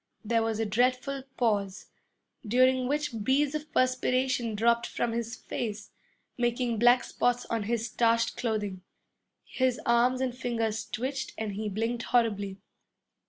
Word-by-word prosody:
There 230 +1 +2
was 225 -1 -1
a 225 - +1
dreadful 255 +5 +1 0.2
pause, 205 -4 0 0.6
during 255 +3 +3
which 285 -6 -2
beads 275 +4 +2
of 305 0 -5
perspiration 255 -2 +1
dropped 235 +2 +2
from 240 - -2
his 230 0 -3
face, 215 -3 -5 0.5
making 240 -1 0
black 245 +2 +5
spots 245 0 0
on 225 -3 -1
his 235 -1 0
starched 230 0 +1
clothing. 210 -5 -2 0.6
His 255 -1 0
arm 240 +2 +3
and 255 -2 -1
fingers 230 -3 -2
twitched 265 +4 -3
and 220 -2 -3
he 210 +2 -3
blinked 225 +4 -2
horribly. 205 -5 +1
235 Hz, 135 wpm, -29 LUFS, 220-255 Hz, 0.6 s, black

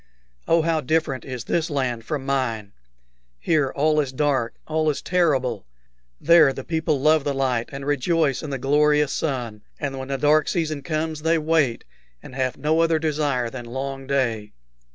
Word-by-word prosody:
Oh, 165 -1 +3
how 165 -1 +1
different 155 -2 -1
is 125 -3 -6
this 165 0 -1
land 125 -6 -2
from 140 -1 -3
mine! 115 -7 -2 0.7
Here 150 - +1
all 155 +2 +2
is 140 -3 -1
dark, 130 -4 0
all 155 0 0
is 145 - -1
terrible. 130 - 0 0.5
There 165 -3 +6
the 135 - -7
people 160 -2 -1
love 155 +1 +3
the 140 -1 -1
light 125 -3 0
and 135 0 -7
rejoice 145 0 +1
in 155 - -6
the 135 - -3
glorious 150 +2 +2
sun, 120 -8 -3 0.2
and 135 -2 -3
when 130 - -6
the 135 0 -2
dark 150 +2 +3
season 155 -4 -1
comes 155 +1 -3
they 165 +1 +2
wait, 155 -6 +1 0.4
and - - -11
have 130 -1 -2
no 155 +3 +1
other 165 -1 +3
desire 145 -6 -1
than 125 -2 -7
long 135 +2 -5
day. 115 -7 -1
140 Hz, 175 wpm, -23 LUFS, 130-155 Hz, 0.7 s, There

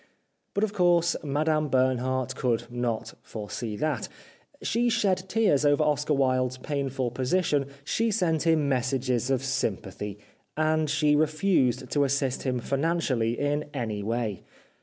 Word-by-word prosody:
But, 200 - +1
of 215 -1 0
course, 175 -3 +3
Madame 155 +1 +1
Bernhardt 130 0 +1
could 120 -3 0
not 120 -2 -2
foresee 110 +1 -5
that. 150 -5 -1 0.5
She 240 +2 +1
shed 190 -4 +1
tears 205 -10 +3
over 145 +1 +4
Oscar 150 0 +1
Wilde's 130 -1 +1
painful 135 -3 -2
position, 140 +2 +1 0.2
she 225 +9 0
sent 175 -7 +1
him 160 -3 +3
messages 130 -2 0
of 135 -1 +1
sympathy, 105 -6 -3 0.4
and 155 0 +2
she 150 0 +3
refused 150 - +1
to 145 - +3
assist 135 -1 0
him 130 -2 -1
financially 135 -5 0
in 145 +1 -1
any 110 -5 -2
way. 110 -2 -2
140 Hz, 135 wpm, -27 LUFS, 125-155 Hz, 0.5 s, over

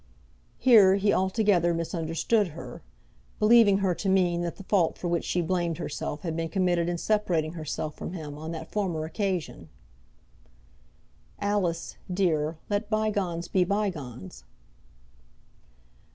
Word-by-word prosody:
Here 210 -7 +6
he 200 +1 +2
altogether 190 -3 +2
misunderstood 165 +5 0
her, - - -9 0.6
believing 215 -2 +6
her 185 - +2
to 195 +3 -3
mean 180 -2 +2
that 170 -1 -3
the 195 - -11
fault 185 -4 +1
for 180 - -4
which 170 -1 0
she 180 - 0
blamed 170 -1 -1
herself 150 +1 -4
had 165 -3 -3
been 165 0 -2
committed 175 -1 +1
in 175 - -1
separating 170 -6 0
herself 155 -1 -5
from - - -6
him 155 -5 -6
on 160 +2 -6
that 160 -1 -7
former 175 -7 -1
occasion. 185 0 -3 1.7
"Alice, 200 -5 -1
dear, 165 -4 0
let 205 +1 -2
bygones 200 -6 -1
be 185 - +2
bygones." 145 - -3
175 Hz, 130 wpm, -27 LUFS, 165-200 Hz, 1.7 s, Here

